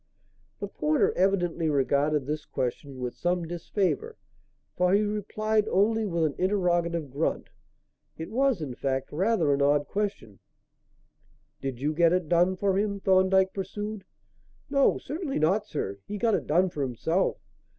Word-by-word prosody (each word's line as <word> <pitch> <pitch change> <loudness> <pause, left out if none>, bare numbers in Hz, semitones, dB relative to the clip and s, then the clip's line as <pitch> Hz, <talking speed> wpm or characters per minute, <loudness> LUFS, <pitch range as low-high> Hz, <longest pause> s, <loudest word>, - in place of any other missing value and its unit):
The 200 - -3
porter 155 -5 +1
evidently 175 -4 +1
regarded 145 0 +1
this 150 +2 -3
question 130 +2 -4
with 125 -1 -3
some 175 -1 -1
disfavour, 195 - -2 0.6
for 180 +1 +2
he 210 - +3
replied 215 +1 0
only 220 +3 +2
with 170 -3 0
an 150 - 0
interrogative 175 -5 0
grunt. 145 +5 -2 0.7
It 160 +4 -7
was, 255 - +1
in 135 -4 -5
fact, 135 +1 -2
rather 175 -3 +2
an 140 - 0
odd 145 +1 +3
question. 200 - -4 1.2
"Did 135 -3 -4
you 150 +3 0
get 170 +1 +4
it 180 -3 0
done 175 +3 +3
for 195 0 +1
him," 200 -1 -1
Thorndyke 190 0 +3
pursued. 205 +1 -5 0.7
"No, 275 -1 +4
certainly 300 0 -4
not, 195 +7 +1
sir. 100 - -4
He 210 - -4
got 225 +1 +1
it - - -1
done 180 +4 +3
for 150 - -4
himself. 140 +8 0
180 Hz, 150 wpm, -27 LUFS, 150-205 Hz, 1.2 s, get